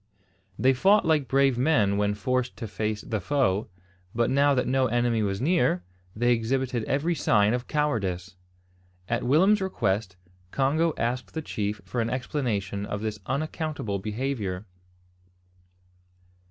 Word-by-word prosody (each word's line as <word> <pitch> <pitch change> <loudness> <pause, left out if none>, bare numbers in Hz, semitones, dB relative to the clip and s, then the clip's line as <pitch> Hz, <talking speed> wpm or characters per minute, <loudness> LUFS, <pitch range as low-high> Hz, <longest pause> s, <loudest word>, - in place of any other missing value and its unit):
They 130 +1 +4
fought 195 +10 +4
like 155 -4 +2
brave 135 -2 +3
men 125 -8 +3
when 105 0 +1
forced 125 +4 -1
to 115 - -5
face 105 0 -3
the 110 -3 -3
foe 110 -6 +1 0.5
but 120 0 +1
now 140 +1 +4
that 125 - +1
no 130 0 +2
enemy 120 -1 +1
was 100 -2 -1
near, 130 - +2 0.3
they 120 +3 +3
exhibited 120 +1 -1
every 150 +5 0
sign 105 -8 +3
of 125 0 -3
cowardice! 100 -11 -1 0.7
At 120 - 0
Willem's 185 +11 +4
request, 105 - -1 0.3
Congo 150 - +1
asked 125 +4 -2
the 160 - -3
chief 105 -6 -3
for 115 +6 -2
an 115 - -1
explanation 115 -7 -2
of 105 0 -4
this 110 -1 -3
unaccountable 145 - -2
behaviour. 105 -3 -3
120 Hz, 140 wpm, -26 LUFS, 105-140 Hz, 0.7 s, They